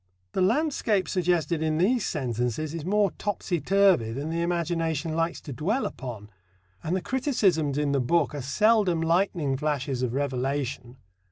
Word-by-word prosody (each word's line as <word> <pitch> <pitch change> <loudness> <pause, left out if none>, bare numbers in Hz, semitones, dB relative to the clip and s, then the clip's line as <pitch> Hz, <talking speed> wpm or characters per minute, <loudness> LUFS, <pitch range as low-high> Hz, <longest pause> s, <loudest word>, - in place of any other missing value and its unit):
The - - -1
landscape 225 -3 +1
suggested 170 -3 0
in 155 -1 0
these 215 +7 +2
sentences 125 +1 -2
is 165 -2 -5
more 200 +2 +2
topsy 190 -5 -2
turvy 190 - +3
than 140 +7 -4
the 165 +1 -1
imagination 165 -2 -1
likes 165 +1 -1
to 145 - -7
dwell 205 - -1
upon. 110 -5 -7 0.5
And 170 - -1
the 190 - -1
criticisms 195 - +1
in 150 -1 +1
the 140 -1 +2
book 155 +5 +1
are 145 - -4
seldom 200 - +2
lightning 165 -4 +1
flashes 140 -3 -2
of 125 -1 -1
revelation. 135 -2 -2
160 Hz, 155 wpm, -26 LUFS, 140-185 Hz, 0.5 s, turvy